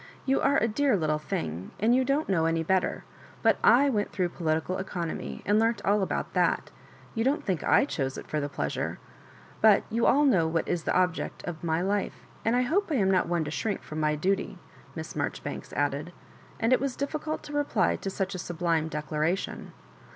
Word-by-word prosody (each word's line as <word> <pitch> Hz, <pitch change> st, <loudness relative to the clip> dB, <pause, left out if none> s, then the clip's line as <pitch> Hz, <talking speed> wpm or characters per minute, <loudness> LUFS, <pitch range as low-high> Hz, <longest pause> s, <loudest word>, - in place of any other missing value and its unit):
"You 270 Hz, 0 st, +2 dB
are 280 Hz, -, +3 dB
a 225 Hz, -, +2 dB
dear 250 Hz, +1 st, +2 dB
little 155 Hz, -3 st, 0 dB
thing, 85 Hz, -, -4 dB
and 225 Hz, +4 st, +3 dB
you 260 Hz, -, +3 dB
don't 275 Hz, +4 st, 0 dB
know 170 Hz, -5 st, +2 dB
any 165 Hz, 0 st, +1 dB
better; 185 Hz, +2 st, 0 dB, 0.4 s
but -, -, +3 dB
/went 245 Hz, -4 st, +4 dB
through 180 Hz, -3 st, -1 dB
Political 165 Hz, +2 st, -1 dB
Economy, 175 Hz, -3 st, -4 dB
and 205 Hz, +1 st, +3 dB
learnt 225 Hz, 0 st, +2 dB
all 205 Hz, +1 st, +3 dB
about 190 Hz, -, -2 dB
that.; -, -, +1 dB, 0.2 s
— -, -, -23 dB
you 225 Hz, -, 0 dB
don't 285 Hz, +4 st, +1 dB
think 185 Hz, -5 st, -1 dB
/ 280 Hz, -, +3 dB
choose 135 Hz, -, -2 dB
it -, -, -7 dB
for 155 Hz, -, -2 dB
the 145 Hz, 0 st, -2 dB
pleasure? -, -, -3 dB, 0.6 s
But 215 Hz, -2 st, +6 dB
you 230 Hz, +1 st, +2 dB
all 295 Hz, +2 st, +5 dB
know 185 Hz, -, +4 dB
what 165 Hz, 0 st, -1 dB
is 170 Hz, -2 st, -1 dB
the -, -, +2 dB
object 180 Hz, -2 st, -1 dB
of 170 Hz, -2 st, -6 dB
my 165 Hz, 0 st, 0 dB
life, 200 Hz, +2 st, -2 dB, 0.2 s
and 225 Hz, +2 st, +2 dB
I 250 Hz, -, +3 dB
hope 355 Hz, +10 st, +1 dB
I -, -, +2 dB
am 195 Hz, -6 st, +3 dB
not 185 Hz, -, +2 dB
one 170 Hz, -2 st, 0 dB
to 150 Hz, -, -5 dB
shrink 205 Hz, +4 st, -2 dB
from 155 Hz, -, -6 dB
my 150 Hz, 0 st, +2 dB
duty," 190 Hz, +4 st, -1 dB, 0.4 s
Miss 160 Hz, -1 st, -6 dB
Marjoribanks -, -, -4 dB
added. 145 Hz, +4 st, -1 dB, 0.5 s
And 230 Hz, +3 st, +3 dB
it -, -, +4 dB
was 275 Hz, -2 st, -1 dB
difficult 305 Hz, +2 st, -3 dB
to 295 Hz, -, -9 dB
reply 290 Hz, 0 st, +1 dB
to 195 Hz, -, -4 dB
such 195 Hz, 0 st, -2 dB
a 185 Hz, -, -5 dB
sublime 165 Hz, -2 st, -1 dB
decla 150 Hz, 0 st, -4 dB
ration. 170 Hz, +5 st, -1 dB
190 Hz, 210 wpm, -28 LUFS, 160-235 Hz, 0.6 s, But